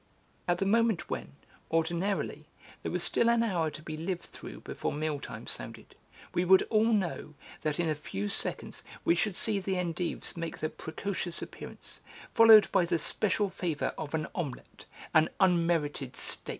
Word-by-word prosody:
At 175 -1 +2
the 195 - 0
moment 225 -1 +2
when, - - -4 0.4
ordinarily, 165 -1 -1 0.3
there - - -3
was 180 0 -1
still 235 - +3
an 235 0 +4
hour 175 -8 +1
to 155 +1 -10
be 155 -1 -5
lived 170 +2 -3
through - - -10
before - - -3
meal 150 -1 -2
time 115 -4 -8
sounded, - - -7 0.4
we 175 - +2
would 190 +1 +6
all 220 +1 +4
know 175 -7 -1 0.3
that 155 +1 -1
in 170 - +1
a 155 - +2
few 105 -9 -4
seconds - - -3 0.2
we - - +5
should 185 +2 0
see 210 +1 +2
the 190 0 -2
endives 175 -1 -2
make 165 -1 -4
their 155 - -2
precocious 175 +1 -4
appearance, - - -10 0.3
followed 225 -2 +9
by - - +4
the 170 0 +1
special 205 +4 +1
favour 165 -7 -2
of 155 0 -4
an 155 -1 -1
omelette, 165 - -6 0.3
an 155 +1 +5
unmerited 165 -8 +2
steak. - - -2
170 Hz, 170 wpm, -30 LUFS, 155-195 Hz, 0.4 s, followed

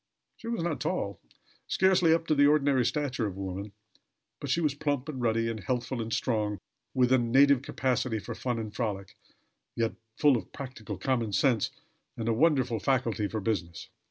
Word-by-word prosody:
She 230 - -10
was 230 -7 -2
not 165 -3 -2
tall; 100 - -2 0.5
scarcely 185 -3 +4
up 165 0 +2
to 155 - +2
the 145 -1 +5
ordinary 140 -3 +3
stature 130 -3 -1
of 95 - -6
woman; 100 +1 -5 0.7
but 140 - -6
she 140 - +2
was 150 -4 +1
plump 145 -2 -2
and 135 -5 -5
ruddy, 115 -1 +1
and 115 -1 -3
healthful 120 +4 -2
and 115 0 -5
strong, 105 -4 0 0.4
with 125 -1 +3
a 130 - +5
native 135 +3 +5
capacity 130 -4 -1
for 105 - -6
fun 125 -2 -2
and 110 -2 -5
frolic, 100 -5 -3 0.6
yet 115 -1 0 0.2
full 145 -4 +5
of 95 - -8
practical 130 -5 -7
common 120 -6 -1
sense, 115 +1 +2 0.5
and 115 - -3
a 115 - +3
wonderful 130 -4 +2
faculty 115 -3 0
for 110 - -3
business. 90 -6 -3
125 Hz, 180 wpm, -29 LUFS, 110-140 Hz, 0.7 s, the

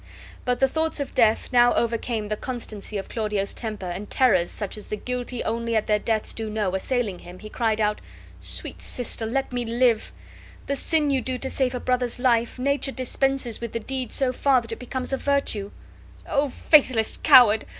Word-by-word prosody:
But 250 -1 0
the 270 - +4
thoughts 320 +3 -1
of 280 - -4
death 225 -3 +3
now 245 0 +5
overcame 230 -2 -1
the 215 - 0
constancy 215 -4 -5
of 195 - -5
Claudio's 210 -3 -2
temper, 215 -4 -5
and 180 +4 -5
terrors, 190 -10 +3
such 205 -3 -4
as 210 - -10
the - - -3
guilty 250 +2 -4
only 230 0 -2
at 215 - +1
their 210 -1 +2
deaths 220 0 -1
do 220 -1 -4
know, 210 -3 -1
assailing 205 -1 -1
him, 175 +1 -11
he 215 +3 -10
cried 220 -1 0
out: 210 -1 0 0.4
"Sweet - - -3
sister, 230 -2 -1
let 265 +2 -2
me 245 -1 -1
live! 235 -1 +1 0.5
The 280 - -1
sin 300 +1 +1
you 265 -2 +1
do 255 0 -2
to 265 +1 -3
save 260 -2 0
a - - -2
brother's 250 -1 0
life, 240 -2 +1
nature 275 +1 0
dispenses 260 -2 0
with 235 -2 -5
the 230 - -1
deed 260 +2 -4
so 260 -2 +1
far 265 0 +3
that 230 -1 -9
it 225 - -5
becomes 255 +1 -4
a - - +1
virtue." 275 -9 0 0.6
"O 280 0 +1
faithless 255 -5 +3
coward! 220 -4 +7
240 Hz, 195 wpm, -24 LUFS, 215-260 Hz, 0.6 s, coward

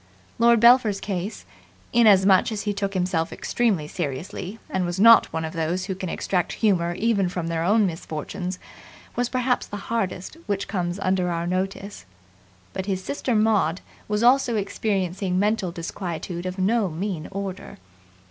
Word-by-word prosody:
Lord 235 0 +5
Belpher's 235 -4 +5
case, 190 +1 -4 0.5
inasmuch 200 -4 +5
as 210 -2 -3
he 205 -1 -1
took 200 0 -3
himself 180 -3 0
extremely 205 -11 0
seriously 175 +6 -5
and 190 - -1
was 175 +1 -3
not 230 +2 +7
one 160 0 -2
of 160 - -6
those 170 +3 -1
who 190 - -3
can 185 -1 -5
extract 180 -1 -1
humour 175 -6 +1
even 200 -2 +1
from 175 -2 -4
their 165 -1 -1
own 210 +4 +4
misfortunes, 175 +2 -4 0.6
was 245 0 0
perhaps 250 -1 0
the 205 - -6
hardest 195 - -3
which 200 -1 -2
comes 175 -2 -2
under 185 -1 +1
our 170 0 -2
notice; 190 - -3 0.7
but 190 0 -4
his 190 -2 -2
sister 260 -2 -2
Maud 210 -6 +2 0.3
was 210 +1 0
also 245 -1 +4
experiencing 195 -2 -1
mental 205 -2 +1
disquietude 175 0 -5
of 185 +1 -5
no 200 +2 +1
mean 170 0 -4
order. 195 -1 -6
190 Hz, 155 wpm, -24 LUFS, 180-210 Hz, 0.7 s, not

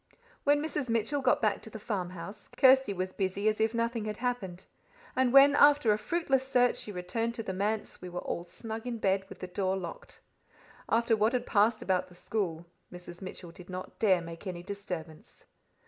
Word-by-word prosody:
When 290 +1 +4
Mrs. 295 -4 -3
Mitchell 230 +5 0
got 260 - +2
back 210 -2 +2
to - - -9
the 220 - -8
farmhouse, 185 -2 -5
Kirsty 265 -4 +6
was 185 -1 -3
busy 195 +1 -1
as 215 0 +1
if 220 0 +3
nothing 230 -1 -1
had 210 -1 -4
happened, 215 -8 -3 0.5
and 255 -1 +3
when, 275 +2 +8
after 290 -6 +6
a - - 0
fruitless 270 0 +1
search, 245 -2 +3
she 210 - -4
returned 215 +6 -2
to 225 - -4
the 190 - -4
manse, 205 +3 -2
we 180 - -7
were 175 0 -4
all 170 - -3
snug 220 +6 -7
in 240 -1 -2
bed, 195 -2 0
with - - -11
the 185 - -4
door 190 +1 -1
locked. - - -8 0.7
After 230 0 +3
what 215 +3 +2
had 250 - 0
passed 215 +2 +2
about 185 -1 +1
the 180 - -17
school, 175 -4 -3 0.3
Mrs. 175 0 -10
Mitchell 185 -2 -7
did 180 +2 -13
not 185 0 -7
dare 190 -5 +4
make 165 +3 -9
any 175 -2 -5
disturbance. 180 -5 -7
210 Hz, 195 wpm, -30 LUFS, 185-235 Hz, 0.7 s, when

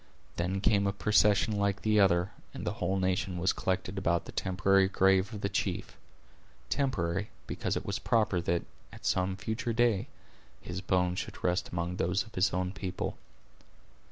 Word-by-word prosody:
Then 95 +3 -1
came 100 -1 +3
a 100 - 0
procession 105 +1 +3
like 100 -1 0
the 105 -1 +3
other, 90 -1 +3 0.2
and - - -5
the - - -1
whole 95 +2 +1
nation 95 -1 0
was 90 +2 +2
collected 95 +1 -2
about 85 -3 +1
the - - -8
temporary 95 +1 +2
grave 95 +1 +3
of 105 -3 -6
the 100 - +1
chief—temporary, 95 - -3 0.2
because - - -2
it - - -5
was 100 +1 -2
proper 110 -7 +2
that, 85 0 0 0.3
at - - -12
some 95 +1 +1
future 110 +3 -2
day, 115 -4 +2 0.5
his 90 +1 -6
bones 90 -1 +1
should - - -7
rest 90 +2 +1
among 85 +1 -3
those 90 +3 +1
of 110 - -17
his 95 +1 +2
own 90 0 -1
people. 95 -1 -4
95 Hz, 165 wpm, -30 LUFS, 90-100 Hz, 0.5 s, came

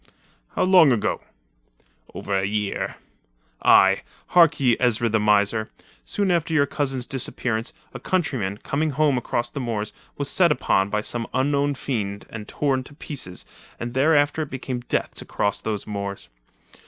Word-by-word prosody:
"How - - +2
long 180 -6 +6
ago?" 115 -4 0 0.9
"Over 100 - -4
a 95 0 +1
year." 105 0 -2 0.7
"Aye. 95 0 +6 0.3
Hark 165 -4 +5
ye, 125 -4 +4
Ezra 120 -2 +2
the 110 0 +2
miser. 105 +1 +2 0.3
Soon 200 -2 0
after 165 -2 0
your 140 -2 +4
cousin's 135 -3 -2
disappearance, 120 -3 -2 0.2
a 125 - -7
countryman, 130 - -1
coming 150 +8 -1
home 145 0 +2
across 120 -1 -1
the 140 - -5
moors, 110 -4 -3 0.2
was 145 - -2
set 175 0 +4
upon 95 -8 +1
by 105 +1 0
some 115 +1 -3
unknown 140 +2 +1
fiend 110 -7 -3
and 110 -1 -7
torn 135 -3 0
to 145 - -14
pieces, 125 - -6 0.3
and 120 0 -5
thereafter 145 +2 +3
it 150 - -4
became 130 -1 -4
death 120 - -2
to - - -6
cross 100 - -1
those 105 -2 -3
moors. 100 -1 -5
125 Hz, 155 wpm, -23 LUFS, 105-145 Hz, 0.9 s, long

